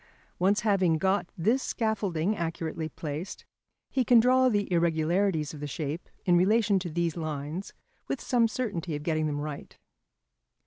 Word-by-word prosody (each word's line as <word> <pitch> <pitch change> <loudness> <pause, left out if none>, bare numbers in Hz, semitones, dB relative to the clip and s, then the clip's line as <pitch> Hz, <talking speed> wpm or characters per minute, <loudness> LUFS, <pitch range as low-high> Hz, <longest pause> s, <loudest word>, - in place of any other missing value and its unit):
Once 195 +3 +3
having 190 -6 +2
got 190 +2 +1
this 225 +10 +2
scaffolding 205 -6 -1
accurately 165 -2 -3
placed, 160 +6 -6 0.5
he 265 - +2
can 240 0 +6
draw 255 +2 +4
the 205 -3 0
irregularities 165 0 +1
of 150 - -8
the 145 - -4
shape 150 +3 -4 0.2
in 180 -2 +4
relation 205 +2 +3
to 180 -1 -5
these 170 0 -1
lines 155 +3 -4 0.4
with 275 - -2
some 235 -2 +2
certainty 200 -9 -3
of 145 - -5
getting 155 -1 0
them 145 -1 -2
right. 150 -1 -6
175 Hz, 150 wpm, -28 LUFS, 155-205 Hz, 0.5 s, can